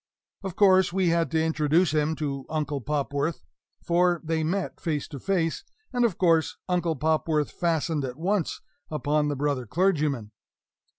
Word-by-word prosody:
Of 190 Hz, -4 st, -5 dB
course 190 Hz, -3 st, +5 dB
we 185 Hz, -1 st, +2 dB
had 170 Hz, 0 st, +1 dB
to 160 Hz, -1 st, +1 dB
introduce 160 Hz, +1 st, +2 dB
him 155 Hz, +1 st, +1 dB
to 140 Hz, -3 st, -4 dB
Uncle 150 Hz, -3 st, -2 dB
Popworth 145 Hz, +3 st, -2 dB, 0.4 s
for 175 Hz, 0 st, +2 dB
they 160 Hz, 0 st, -1 dB
met 185 Hz, +4 st, -2 dB
face 150 Hz, -4 st, -2 dB
to 140 Hz, -, -7 dB
face; 170 Hz, -1 st, 0 dB, 0.3 s
and 245 Hz, -1 st, +2 dB
of 220 Hz, -8 st, +1 dB
course 165 Hz, -3 st, +2 dB
Uncle 175 Hz, -3 st, 0 dB
Popworth 155 Hz, 0 st, 0 dB
fastened 165 Hz, -3 st, 0 dB
at 125 Hz, 0 st, -5 dB
once 185 Hz, +1 st, -1 dB, 0.3 s
upon 150 Hz, 0 st, 0 dB
the 145 Hz, -, -1 dB
brother 140 Hz, -3 st, -1 dB
clergyman. 150 Hz, -, 0 dB
160 Hz, 155 wpm, -26 LUFS, 150-175 Hz, 0.4 s, course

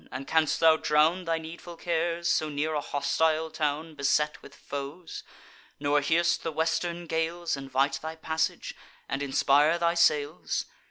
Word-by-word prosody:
and 130 Hz, +1 st, -6 dB
canst 160 Hz, 0 st, +1 dB
thou 160 Hz, -1 st, +6 dB
drown 160 Hz, +4 st, +2 dB
Thy 165 Hz, 0 st, 0 dB
needful 165 Hz, +1 st, -9 dB
cares, 170 Hz, 0 st, -1 dB
so 155 Hz, -2 st, +1 dB
near 150 Hz, +2 st, -2 dB
a 150 Hz, -, 0 dB
hostile 160 Hz, +3 st, 0 dB
town, 155 Hz, +1 st, -2 dB
Beset 150 Hz, +1 st, 0 dB
with -, -, -14 dB
foes; 145 Hz, +5 st, -7 dB, 0.6 s
nor 145 Hz, 0 st, +2 dB
hear'st 170 Hz, +4 st, +2 dB
the 165 Hz, -, -3 dB
western 165 Hz, +2 st, -1 dB
gales 165 Hz, +1 st, -1 dB
Invite 135 Hz, 0 st, 0 dB
thy 160 Hz, +1 st, -5 dB
passage, 160 Hz, 0 st, -2 dB, 0.3 s
and 135 Hz, -, -3 dB
inspire 145 Hz, +3 st, +3 dB
thy 170 Hz, 0 st, +2 dB
sails? 145 Hz, -, +1 dB
160 Hz, 150 wpm, -28 LUFS, 145-165 Hz, 0.6 s, thou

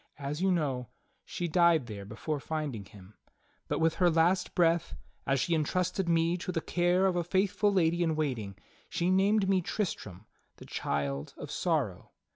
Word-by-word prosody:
As 145 Hz, +2 st, -4 dB
3^ou 190 Hz, 0 st, +3 dB
know, 135 Hz, -, -1 dB, 0.3 s
she 175 Hz, -, -4 dB
died 170 Hz, -4 st, +4 dB
there 105 Hz, -4 st, -7 dB
before 130 Hz, +9 st, -4 dB
find 155 Hz, -3 st, -3 dB
ing 100 Hz, -2 st, -7 dB
him; 95 Hz, 0 st, -15 dB, 0.5 s
but -, -, -1 dB
with 165 Hz, 0 st, +2 dB
her 175 Hz, -, +6 dB
last 175 Hz, +3 st, +2 dB
breath, 170 Hz, -1 st, +2 dB, 0.3 s
as 135 Hz, 0 st, +2 dB
she 170 Hz, -, 0 dB
entrusted 180 Hz, +3 st, 0 dB
me 165 Hz, +1 st, +2 dB
to 185 Hz, +1 st, -4 dB
the 170 Hz, -, -1 dB
care 175 Hz, +3 st, +2 dB
of 185 Hz, -2 st, +2 dB
a 175 Hz, -, +1 dB
faithful 195 Hz, +3 st, +1 dB
lady 170 Hz, -3 st, +2 dB
in 165 Hz, -2 st, +1 dB
waiting, 125 Hz, -10 st, -2 dB, 0.3 s
she 175 Hz, +2 st, 0 dB
named 195 Hz, +2 st, +3 dB
me 190 Hz, -1 st, +3 dB
Tristram 110 Hz, -, -4 dB, 0.2 s
— -, -, -44 dB
the -, -, -12 dB
child 70 Hz, -1 st, -3 dB
of -, -, -7 dB
sorrow. -, -, -1 dB
165 Hz, 180 wpm, -30 LUFS, 135-180 Hz, 0.5 s, her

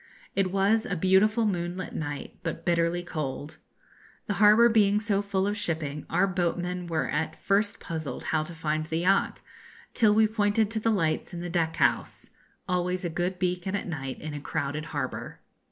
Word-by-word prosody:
It 195 Hz, -2 st, +1 dB
was 205 Hz, +4 st, +2 dB
a 195 Hz, -, -1 dB
beautiful 195 Hz, +6 st, +3 dB
moonlight 180 Hz, -2 st, -2 dB
night, 145 Hz, -3 st, -5 dB
but 165 Hz, -2 st, -5 dB
bitterly 170 Hz, 0 st, +1 dB
cold. 150 Hz, -3 st, -5 dB, 0.7 s
The 205 Hz, -, -1 dB
harbour 215 Hz, +3 st, +7 dB
being 210 Hz, -3 st, +4 dB
so 205 Hz, -2 st, 0 dB
full 200 Hz, -1 st, -1 dB
of 205 Hz, +1 st, 0 dB
shipping, 155 Hz, -7 st, -2 dB
our 195 Hz, -, +3 dB
boatmen 180 Hz, -1 st, -2 dB
were 155 Hz, -6 st, -1 dB
at 150 Hz, +2 st, -2 dB
first 205 Hz, +1 st, +1 dB
puzzled 155 Hz, -6 st, -5 dB
how 155 Hz, -, +3 dB
to 170 Hz, -, -8 dB
find 155 Hz, -1 st, -2 dB
the 160 Hz, +1 st, -1 dB
yacht, 195 Hz, +2 st, +2 dB, 0.5 s
till 215 Hz, -3 st, +4 dB
we 220 Hz, 0 st, +6 dB
pointed 210 Hz, 0 st, +1 dB
to 225 Hz, -, 0 dB
the 225 Hz, -, +1 dB
lights 175 Hz, -4 st, 0 dB
in 170 Hz, -, -5 dB
the 175 Hz, -1 st, -5 dB
deck 165 Hz, -2 st, 0 dB
house -, -, 0 dB, 0.4 s
always 180 Hz, 0 st, -1 dB
a 170 Hz, -, -2 dB
good 180 Hz, +3 st, -2 dB
beacon 180 Hz, +1 st, -1 dB
at -, -, -2 dB
night 135 Hz, -6 st, -5 dB
in 155 Hz, -1 st, -6 dB
a 145 Hz, -, -5 dB
crowded 145 Hz, +2 st, -3 dB
harbour. -, -, -5 dB
180 Hz, 180 wpm, -27 LUFS, 160-200 Hz, 0.7 s, harbour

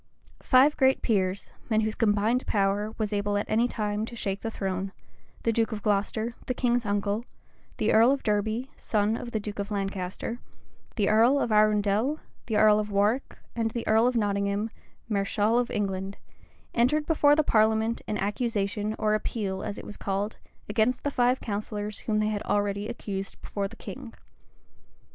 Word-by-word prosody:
Five 270 Hz, +3 st, +5 dB
great 265 Hz, -1 st, +3 dB
peers, 195 Hz, -4 st, 0 dB, 0.2 s
men 220 Hz, -1 st, +3 dB
whose 215 Hz, 0 st, -1 dB
combined 220 Hz, +3 st, +1 dB
power 205 Hz, +2 st, 0 dB
was 215 Hz, -1 st, -2 dB
able 205 Hz, 0 st, 0 dB
at 205 Hz, -, -1 dB
any 230 Hz, +3 st, +2 dB
time 210 Hz, -3 st, -2 dB
to 235 Hz, -, -8 dB
shake 200 Hz, -3 st, -3 dB
the 225 Hz, -, -2 dB
throne, 190 Hz, -2 st, -3 dB, 0.5 s
the 230 Hz, -, +2 dB
duke 225 Hz, +1 st, +1 dB
of 210 Hz, -2 st, -5 dB
Glocester, 215 Hz, +2 st, 0 dB
the 255 Hz, -, -1 dB
king's 240 Hz, -3 st, +1 dB
uncle; 205 Hz, +2 st, 0 dB, 0.5 s
the 215 Hz, -, +1 dB
earl 230 Hz, +4 st, +6 dB
of 275 Hz, -1 st, -1 dB
Derby, 220 Hz, +5 st, -1 dB
son 215 Hz, 0 st, 0 dB
of 240 Hz, -, -5 dB
the 220 Hz, -, -2 dB
duke 205 Hz, 0 st, -6 dB
of 200 Hz, 0 st, -3 dB
Lancaster; 195 Hz, +2 st, -3 dB, 0.6 s
the 205 Hz, -4 st, +1 dB
earl 235 Hz, +6 st, +5 dB
of 240 Hz, -, -1 dB
Arundel; 215 Hz, +6 st, +3 dB, 0.3 s
the 220 Hz, -2 st, 0 dB
earl 215 Hz, 0 st, +6 dB
of 210 Hz, 0 st, -2 dB
Warwick; 210 Hz, +6 st, +1 dB, 0.2 s
and 225 Hz, -1 st, 0 dB
the 235 Hz, +1 st, -5 dB
earl 220 Hz, +2 st, +4 dB
of 250 Hz, -, 0 dB
Nottingham, 200 Hz, 0 st, 0 dB, 0.4 s
mareschal 210 Hz, +2 st, +1 dB
of 245 Hz, -, -1 dB
England, 195 Hz, -2 st, -2 dB, 0.6 s
entered 275 Hz, +6 st, +2 dB
before 295 Hz, -2 st, +4 dB
the 310 Hz, -, +3 dB
parliament 220 Hz, -1 st, +2 dB
an 210 Hz, -, -1 dB
accusation, 210 Hz, 0 st, -1 dB
or 215 Hz, -1 st, +1 dB
appeal, 205 Hz, -3 st, -2 dB
as 200 Hz, -, -4 dB
it -, -, -8 dB
was 210 Hz, -, -7 dB
called, 200 Hz, +2 st, -2 dB, 0.3 s
against 225 Hz, +4 st, +1 dB
the 285 Hz, -, 0 dB
five 250 Hz, 0 st, +2 dB
counsellors 210 Hz, 0 st, -4 dB
whom 215 Hz, -2 st, -1 dB
they 215 Hz, 0 st, +1 dB
had 210 Hz, -1 st, -2 dB
already 205 Hz, 0 st, 0 dB
accused 200 Hz, -4 st, -5 dB
before 200 Hz, -1 st, -2 dB
the -, -, -13 dB
king. 255 Hz, -3 st, -9 dB
215 Hz, 175 wpm, -27 LUFS, 205-235 Hz, 0.6 s, earl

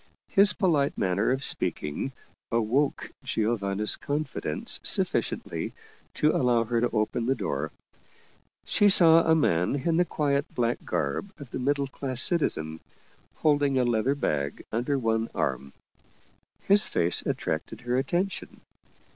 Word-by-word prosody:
His 200 Hz, -1 st, +6 dB
polite 155 Hz, -7 st, 0 dB
manner 95 Hz, +2 st, 0 dB
of 130 Hz, +2 st, -1 dB
speaking 75 Hz, -, -2 dB, 0.4 s
awoke 120 Hz, +5 st, 0 dB
Giovanna's 105 Hz, -2 st, -1 dB
confidence 145 Hz, -, -1 dB
sufficiently -, -, 0 dB, 0.4 s
to 150 Hz, +1 st, +2 dB
allow 120 Hz, -3 st, +2 dB
her 115 Hz, 0 st, -1 dB
to 120 Hz, -, +1 dB
open 115 Hz, +1 st, -1 dB
the 135 Hz, -, +2 dB
door. 70 Hz, -, -3 dB, 0.9 s
She 205 Hz, -, +3 dB
saw 165 Hz, -4 st, +7 dB
a 160 Hz, 0 st, +3 dB
man 90 Hz, -, +1 dB
in 160 Hz, +4 st, -1 dB
the 175 Hz, -, +4 dB
quiet 145 Hz, -3 st, -2 dB
black 120 Hz, 0 st, -1 dB
garb 70 Hz, -, -3 dB
of 145 Hz, -5 st, -12 dB
the -, -, -4 dB
middle 140 Hz, +2 st, 0 dB
class 130 Hz, -1 st, -5 dB
citizen, 80 Hz, -, +1 dB, 0.6 s
holding 145 Hz, -3 st, +1 dB
a 130 Hz, -, +3 dB
leather 120 Hz, +3 st, 0 dB
bag 70 Hz, -, -3 dB
under 120 Hz, +5 st, -1 dB
one 115 Hz, -2 st, -1 dB
arm. 70 Hz, 0 st, -2 dB, 0.9 s
His 205 Hz, +1 st, +6 dB
face 85 Hz, +1 st, +2 dB
attracted 80 Hz, +7 st, -4 dB
her 120 Hz, 0 st, -2 dB
attention. 175 Hz, +9 st, -2 dB
130 Hz, 130 wpm, -26 LUFS, 110-145 Hz, 0.9 s, saw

